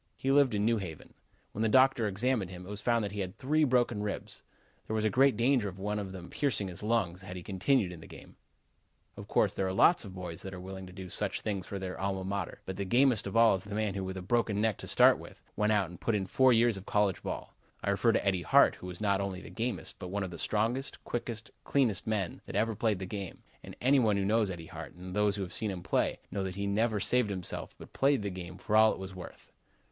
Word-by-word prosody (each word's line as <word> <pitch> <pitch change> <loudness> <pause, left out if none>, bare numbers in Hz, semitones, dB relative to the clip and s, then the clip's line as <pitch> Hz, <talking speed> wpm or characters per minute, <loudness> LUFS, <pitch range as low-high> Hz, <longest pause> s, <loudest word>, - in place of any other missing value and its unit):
He 135 - 0
lived 135 -5 +4
in 105 0 +1
New 115 0 +3
Haven. 80 -6 -8 0.4
When 105 - -5
the 110 - +2
doctor 130 -1 +4
examined 105 0 0
him, 90 -1 -9
it - - -10
was 105 0 -3
found 115 -2 +2
that 100 - -4
he 105 - -5
had 95 -1 -4
three 155 +4 +2
broken 120 -5 +2
ribs. 105 -1 -5 0.5
There 110 - -2
was 110 0 +2
great 135 0 +4
danger 120 -3 +2
of 95 - -11
one 105 +2 -2
of 100 -2 -5
them 90 -2 -9
piercing 105 -9 0
his 90 - -7
lungs 105 -5 0
had 95 -1 -8
he 90 - -7
continued 100 +2 +1
in 85 - -9
the - - -12
game. - - -13 0.8
Of - - -9
course, - - +2
there 95 - -1
are 95 - -2
lots 170 - +5
of 95 -3 -9
boys 90 -3 -6
that 95 -1 -7
are - - -8
willing 95 +1 -8
to - - -11
do 95 0 -8
such - - -1
things 100 -3 -3
for 100 - -4
their 95 -1 -5
Alma 95 -1 -2
Mater, 95 -1 -4
but 95 - -5
the 100 - -1
gamest 120 +2 +3
of - - -2
all 115 -1 +7
is 95 -1 -2
the 105 0 -6
man 105 -2 0
who, 95 0 -3
with 95 0 -5
a 95 - -6
broken 110 0 +1
neck 110 -1 +1
to - - -8
start - - +5
with, - - -12 0.2
went 105 +1 +2
out 100 -5 +1
and 90 - -12
put 115 - +1
in 100 -2 0
four 130 +7 +4
years 115 -2 +4
of 95 - -10
college 105 -4 +2
football. - - -6 0.3
I - - +1
refer - - +3
to - - 0
Eddie 95 -2 +1
Hart, 85 - +5
who 90 - -10
was 90 +1 -8
not 100 -2 +2
only 95 -2 -3
the - - -11
gamest, 120 +2 -4
but 90 - -6
one 100 +2 -2
of 95 - -5
the 85 - -7
strongest, 115 +6 -1
quickest, 115 -2 -4
cleanest 125 -9 +1
men 100 -5 -2
that - - -7
ever 110 +2 +1
played 110 0 0
the 95 - -5
game, 100 -1 -6 0.2
and - - -10
any 135 +2 +4
one 110 -4 +3
who 100 - 0
knows 110 0 +2
Eddie 85 -3 -6
Hart 80 0 -9
and 90 +1 -8
those 105 -1 +2
who 100 - -3
have 90 0 -7
seen 110 0 -2
him 90 -3 -5
play, - - +1
know 100 -1 -2
that 95 -1 -4
he 100 0 -3
never 105 +2 +1
saved 125 +2 +2
himself 95 -3 -3
but - - -13
played 135 -4 +2
the 100 - -2
game 90 0 -8
for 105 +3 -2
all 110 0 +7
it - - -7
was 95 0 -7
worth. 90 -1 -11
100 Hz, 265 wpm, -31 LUFS, 95-115 Hz, 0.8 s, all